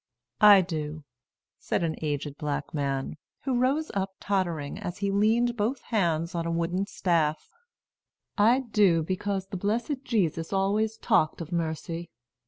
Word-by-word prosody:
"I 205 Hz, -2 st, +9 dB
do," 155 Hz, -3 st, -4 dB, 0.6 s
said -, -, -1 dB
an 160 Hz, -1 st, -1 dB
aged 145 Hz, -1 st, -3 dB
black 145 Hz, -1 st, -3 dB
man, 140 Hz, 0 st, -2 dB, 0.2 s
who 260 Hz, -3 st, 0 dB
rose 280 Hz, +5 st, +1 dB
up 195 Hz, -1 st, -2 dB
tottering, 175 Hz, -8 st, -1 dB
as 175 Hz, -, -5 dB
he 200 Hz, -1 st, -1 dB
leaned 225 Hz, +4 st, +2 dB
both 235 Hz, +4 st, -1 dB
hands 170 Hz, -5 st, 0 dB
on 170 Hz, -1 st, -2 dB
a -, -, -1 dB
wooden 170 Hz, +4 st, -1 dB
staff, 160 Hz, -6 st, 0 dB, 0.8 s
"I 230 Hz, +5 st, +4 dB
do; 205 Hz, -9 st, +3 dB
because 190 Hz, +2 st, -2 dB
the 195 Hz, -, -6 dB
blessed 235 Hz, -, -1 dB
Jesus 170 Hz, -, 0 dB
always 210 Hz, +3 st, +1 dB
talked 155 Hz, -7 st, +2 dB
of 165 Hz, 0 st, -7 dB
mercy. 165 Hz, 0 st, -3 dB
185 Hz, 145 wpm, -27 LUFS, 160-210 Hz, 0.8 s, I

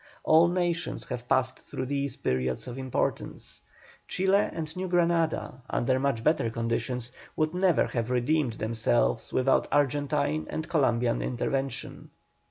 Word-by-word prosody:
All 160 Hz, +2 st, +6 dB
nations 175 Hz, -1 st, -1 dB
have 125 Hz, -2 st, -5 dB
passed 130 Hz, 0 st, +1 dB
through 130 Hz, -, -5 dB
these 140 Hz, +1 st, -2 dB
periods 65 Hz, -, -1 dB
of 125 Hz, +1 st, -6 dB
impotence. 130 Hz, -1 st, -3 dB, 0.5 s
Chile 190 Hz, +2 st, +2 dB
and 160 Hz, -1 st, -5 dB
New 185 Hz, +1 st, -3 dB
Granada, 170 Hz, -6 st, +1 dB
under 130 Hz, +2 st, +1 dB
much 135 Hz, -4 st, 0 dB
better 150 Hz, -5 st, +2 dB
conditions, 115 Hz, +1 st, -2 dB, 0.2 s
would 155 Hz, 0 st, 0 dB
never 180 Hz, -2 st, +3 dB
have 115 Hz, -1 st, -2 dB
redeemed 125 Hz, +1 st, +1 dB
themselves 110 Hz, -, 0 dB
without 130 Hz, +1 st, +2 dB
Argentine 145 Hz, +1 st, +1 dB
and 155 Hz, +1 st, -4 dB
Columbian 120 Hz, -6 st, +1 dB
intervention. 135 Hz, +1 st, -3 dB
135 Hz, 130 wpm, -28 LUFS, 120-160 Hz, 0.5 s, All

